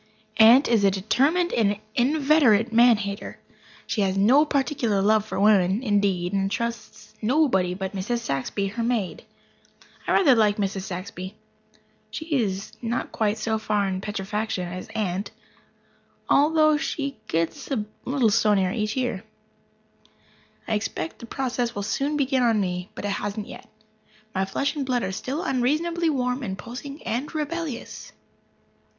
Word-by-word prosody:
Aunt 235 +6 +7
is 225 -4 +3
a 200 - +6
determined 275 - +1
and 205 -3 +1
inveterate 260 -4 +3
man 235 0 +6
hater. 200 0 -5 0.5
She 225 -2 -1
has 195 -1 +1
no 255 +10 +5
particular 265 -7 0
love 210 +2 +3
for - - -3
women, 200 +1 +3
indeed, 200 -5 +1
and 195 0 +1
trusts 235 +2 -5
nobody 215 - +2
but 190 +1 -4
Mrs. 200 +5 -2
Saxby, 195 - -2
her 230 +4 -4
maid. 230 -6 -2 0.8
I - - +2
rather 305 -9 +5
like 215 -3 +3
Mrs. 195 -2 -2
Saxby. 185 0 -6 0.7
She 315 - -6 0.2
is 195 -2 -3
not 235 0 -2
quite 215 -1 0
so 220 -1 -1
far 210 -2 0
gone 190 - -1
in 185 - -4
petrifaction 205 -1 -3
as 180 +1 -7
Aunt, 195 -1 -2 1.0
although 310 +1 +4
she 280 -3 -3
gets 165 -4 -2
a 235 -7 -1 0.2
little 255 -4 +2
stonier 200 -3 +3
every 215 +2 -1
year. 245 -7 -2 1.4
I - - -1
expect 210 -6 -3
the 235 - -9
process 245 -2 -2
will 205 - -3
soon 285 +8 -1
begin 270 -2 +1
on 230 -3 +3
me, 180 -2 -2
but - - -6
it - - -1
hasn't 205 +1 -3
yet. - - -11 0.6
My 190 0 0
flesh 275 +11 -1
and 290 - -2
blood 250 -2 0
are - - -2
still 265 - -4
unreasonably 315 +7 0
warm 250 -2 -1
and 190 -6 -4
pulsing 275 +7 -8
and 240 +6 -3
rebellious. 310 -4 -5
220 Hz, 150 wpm, -24 LUFS, 195-265 Hz, 1.4 s, Aunt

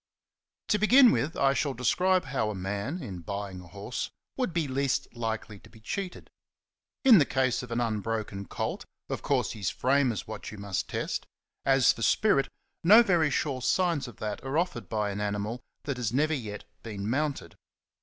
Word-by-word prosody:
To 210 - +3
begin 245 +3 +7
with, 155 -4 -1
I 135 0 +4
shall 140 -1 -1
describe 180 +10 +2
how 125 -5 -1
a 105 - -4
man, 100 - -3
in 95 -7 -6
buying 100 +1 -5
a 90 - -13
horse, 100 +7 -5 0.3
would 255 -8 -1
be 165 -3 0
least 140 0 0
likely 110 -3 -4
to - - -17
be 110 - -17
cheated. 180 - -5 0.7
In 235 -7 +9
the - - +6
case 130 -2 +1
of 125 - -9
an 115 0 -1
unbroken 110 -3 -2
colt, - - -3 0.3
of - - -3
course - - +1
his 100 -5 -2
frame 135 0 +2
is 105 - -4
what 110 - -7
you 105 - -9
must 100 -2 -3
test; - - -3 0.4
as 135 -2 +5
for 115 - -10
spirit, 140 - +3 0.3
no 215 +7 +8
very 175 -7 +3
sure 135 -2 -1
signs 155 +1 +1
of 120 - -11
that 105 -1 -4
are 135 +3 -2
offered 170 -9 -1
by 105 -2 0
an 100 +1 -4
animal 105 +3 -2 0.2
that 140 -3 -3
has 120 -4 -1
never 150 +5 +2
yet 105 -8 -5 0.2
been 105 -3 -5
mounted. 140 +4 -2
125 Hz, 185 wpm, -28 LUFS, 105-150 Hz, 0.7 s, In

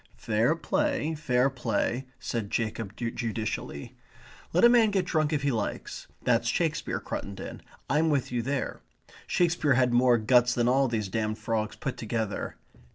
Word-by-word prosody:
"Fair 115 +8 +1
play, 280 - 0
fair 130 -4 +2
play," 125 0 -1
said 110 -4 -3
Jacob 110 -2 -2
judicially. 115 - -4 0.6
"Let 175 - +2
a - - +11
man 235 -2 +5
get 195 -3 +1
drunk 155 -3 +1
if 150 -2 0
he 140 - +2
likes. 110 -4 -4 0.2
That's - - +2
Shakespeare, - - 0
Cruttendon. 100 -1 -6 0.3
I'm 155 +3 +2
with 140 -5 0
you 120 -1 0
there. 135 +3 -3 0.5
Shakespeare 165 -6 +2
had 125 -1 +3
more 120 0 +5
guts 120 +2 +4
than 120 0 +2
all 135 +2 +4
these 110 -4 -1
damned 110 +2 -2
frogs 110 -2 -2
put 135 - -4
together. 110 -2 -3
125 Hz, 155 wpm, -28 LUFS, 115-150 Hz, 0.6 s, a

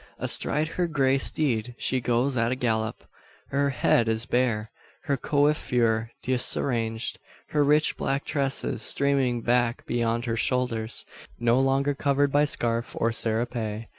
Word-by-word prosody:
Astride 150 +2 +2
her 175 +2 -2
grey 135 -4 +1
steed 125 -5 0
she 130 - -1
goes 125 +3 0
at 115 -1 +1
a - - 0
gallop. 110 -4 -2 0.5
Her 140 +1 +1
head 120 -3 +2
is 110 +1 0
bare; 115 -4 0 0.3
her 140 - 0
coiffure 125 -7 +1
disarranged; 120 -2 -1 0.3
her 150 -1 +2
rich 150 +2 +2
black 135 +1 -2
tresses 140 -2 -1
streaming 135 -4 +2
back 120 -1 +1
beyond 120 0 -1
her 115 -2 -1
shoulders, 115 -2 -1 0.3
no 120 +1 +2
longer 135 +2 +1
covered 140 0 +1
by 145 +1 +3
scarf 115 -4 0
or 115 - +1
serape. 115 -1 -2
125 Hz, 135 wpm, -26 LUFS, 115-140 Hz, 0.5 s, by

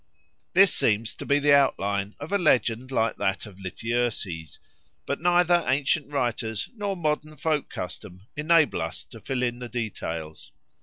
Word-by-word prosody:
This 190 +1 +6
seems 110 +1 +1
to - - -8
be 140 - +4
the 145 0 +4
outline 100 -7 +1
of 145 +5 -7
a 200 - +2
legend 125 - +2
like 115 -3 +1
that 95 +1 -1
of 100 -3 -13
Lityerses; 100 - -3 0.5
but 140 - -3
neither 175 0 +4
ancient 140 +2 +1
writers 120 -6 -1
nor 205 -3 -2
modern 155 -1 -2
folk 155 0 0
custom 90 +2 -7
enable 155 - +3
us 80 0 -4
to - - -12
fill 130 -2 -2
in 120 0 -1
the 125 -1 -6
details. 80 -10 -5
125 Hz, 155 wpm, -26 LUFS, 105-150 Hz, 0.5 s, This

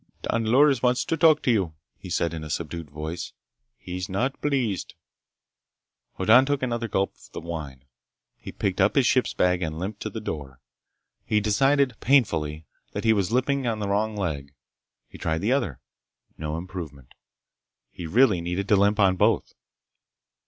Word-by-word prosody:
"Don 115 -1 0
Loris 135 +2 +4
wants 125 0 +2
to 165 - 0
talk 160 -2 +4
to 125 - +3
you," 95 -8 0 0.2
he - - -11
said 85 -1 0
in 80 -1 -5
a 75 - -7
subdued 80 +1 -4
voice. 80 +4 -6 0.4
"He's 90 0 -6
not 120 +8 -2
pleased." 130 -9 -1 1.2
Hoddan 125 +5 +5
took 145 -2 0
another 120 -2 -1
gulp 95 -2 0
of - - -19
the - - -5
wine. 75 -6 -7 0.5
He - - -10
picked - - -1
up - - +3
his - - +4
ship - - +3
bag 90 0 +2
and 80 -2 -3
limped 100 +4 -5
to - - -3
the 110 - -6
door. 70 - -6 0.6
He 105 - +1
decided 135 +6 +2
painfully 80 - +1 0.3
that - - -3
he 110 -1 +4
was 100 -2 0
limping 130 +1 +1
on 115 -2 0
the 105 -1 -3
wrong 105 +1 0
leg. 70 -7 -4 0.5
He - - -13
tried 80 +1 -1
the 105 +5 +1
other. 125 - 0 0.6
No 75 0 -4
improvement. 80 -7 -8 0.8
He 85 - -7
really 105 -1 +4
needed 90 +3 -3
to 105 - +6
limp 100 +2 +3
on 95 -2 +4
both. - - +2
100 Hz, 170 wpm, -25 LUFS, 80-120 Hz, 1.2 s, to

